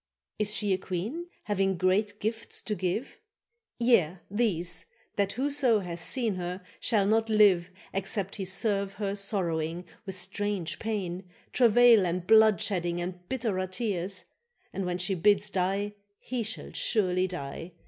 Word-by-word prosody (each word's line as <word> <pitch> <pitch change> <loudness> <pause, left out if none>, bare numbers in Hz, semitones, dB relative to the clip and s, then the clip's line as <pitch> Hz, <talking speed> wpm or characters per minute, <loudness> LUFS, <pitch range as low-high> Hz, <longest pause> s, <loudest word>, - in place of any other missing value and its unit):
—Is 210 0 +3
she 205 -3 +1
a 185 - 0
queen, 220 - -4 0.2
having 195 -2 0
great 205 +3 +1
gifts 220 +1 -3
to 215 - -2
give? 185 +6 -3 0.6
—Yea, 225 -8 +3
these; 185 -6 -1 0.3
that 200 -1 +1
whoso 265 -4 +2
hath 175 -2 -5
seen 225 +6 0
her 180 +1 -4 0.2
shall 210 -4 +2
not 225 +2 +2
live 200 -5 +5 0.2
Except 195 0 -2
he 195 - -3
serve 195 +1 -1
her 200 -1 -2
sorrowing, 175 -4 0 0.2
with 190 - -1
strange 190 -1 -2
pain, 190 -4 -3 0.2
Travail 235 -4 +6
and 175 +1 -2
bloodshedding 195 -5 +4
and 180 0 -6
bitterer 220 -8 -1
tears; 185 -1 -2 0.5
And 195 -2 -2
when 175 0 -1
she 180 +2 -1
bids 205 +3 +3
die 195 +2 0 0.3
he 250 -2 -3
shall 220 0 -5
surely 185 -4 +1
die. 165 0 -6
195 Hz, 140 wpm, -29 LUFS, 180-215 Hz, 0.6 s, Travail